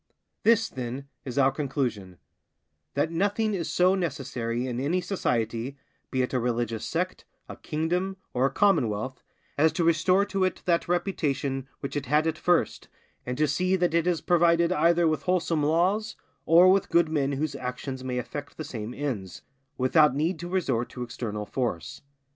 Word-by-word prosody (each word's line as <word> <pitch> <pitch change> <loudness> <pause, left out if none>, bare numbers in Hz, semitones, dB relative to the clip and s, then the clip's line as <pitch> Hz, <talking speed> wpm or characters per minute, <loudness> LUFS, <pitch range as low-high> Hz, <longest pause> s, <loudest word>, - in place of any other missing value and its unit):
This, 225 -1 +4
then, 130 +2 -6 0.2
is 125 -1 -6
our 135 -1 +5
conclusion—that 115 - -5
nothing 205 +5 0
is 170 -5 -2
so 180 +1 +3
necessary 130 -9 -2
in 125 -1 -3
any 155 +7 +1
society, 120 - -2 0.3
be 130 -1 0
it 125 - -3
a 130 - +2
religious 120 -2 -1
sect, - - -3 0.2
a - - -8
kingdom, 180 +5 -2 0.2
or 130 +2 +3
a - - -4
commonwealth, 130 - +1 0.4
as 160 +2 +5
to 175 - 0
restore 175 +4 +3
to 195 -2 -1
it 185 - -1
that 170 -2 +1
reputation 145 -7 -1
which 140 - -5
it 145 -3 -3
had 150 +3 +3
at 160 - -1
first, 175 -1 +1 0.4
and 125 0 -3
to 155 - +3
see 185 +7 +1
that 175 -3 +1
it 170 +1 +2
is 175 -3 +1
provided 170 -1 +3
either 170 +2 +3
with 155 -1 0
wholesome 175 -3 +1
laws, 180 +8 +1 0.3
or 175 +3 +7
with 195 0 +2
good 170 -1 +4
men 145 -3 0
whose 145 +2 -2
actions 130 +1 -5
may 125 -1 -3
effect 145 +3 -6
the 155 - -4
same 115 -4 -6
ends, 105 - -4 0.3
without 135 +2 +4
need 160 +3 0
to 175 +1 -6
resort 135 -11 0
to 125 - -6
external 105 -3 -5
force. 110 -9 -3
150 Hz, 170 wpm, -27 LUFS, 125-175 Hz, 0.4 s, or